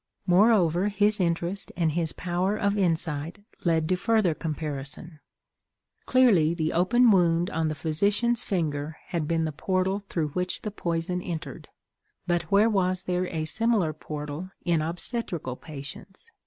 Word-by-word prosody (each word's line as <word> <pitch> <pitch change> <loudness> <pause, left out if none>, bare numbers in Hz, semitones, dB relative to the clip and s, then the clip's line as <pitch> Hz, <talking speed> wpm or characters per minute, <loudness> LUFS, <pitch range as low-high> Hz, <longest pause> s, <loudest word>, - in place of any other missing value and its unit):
Moreover, 185 -2 +4
his 210 +1 +3
interest 175 +2 -1
and 165 -3 +2
his 160 0 0
power 180 +3 -1
of 200 -1 +1
insight 165 -3 -1 0.3
led 160 -2 +2
to 185 - +3
further 215 -2 +2
comparison. 150 0 -5 0.9
Clearly, 195 -11 +4
the 160 -2 -1
open 235 +7 +4
wound 175 -2 +3
on 160 0 0
the 155 - -2
physician's 200 +10 +1
finger 155 -4 -2
had 165 -4 -2
been 165 0 +1
the 155 - -2
portal 185 +5 0
through 170 -6 -3
which 180 +4 -2
the 210 - -3
poison 175 -1 -2
entered; 170 -3 -6 0.6
but 170 -2 -1
where 205 +3 +5
was 185 -4 +1
there 180 0 -1
a 160 -3 -3
similar 215 -4 +1
portal 150 +3 -6 0.2
in 170 -3 +2
obstetrical 170 - -3
patients? 155 - -10
175 Hz, 140 wpm, -26 LUFS, 160-195 Hz, 0.9 s, where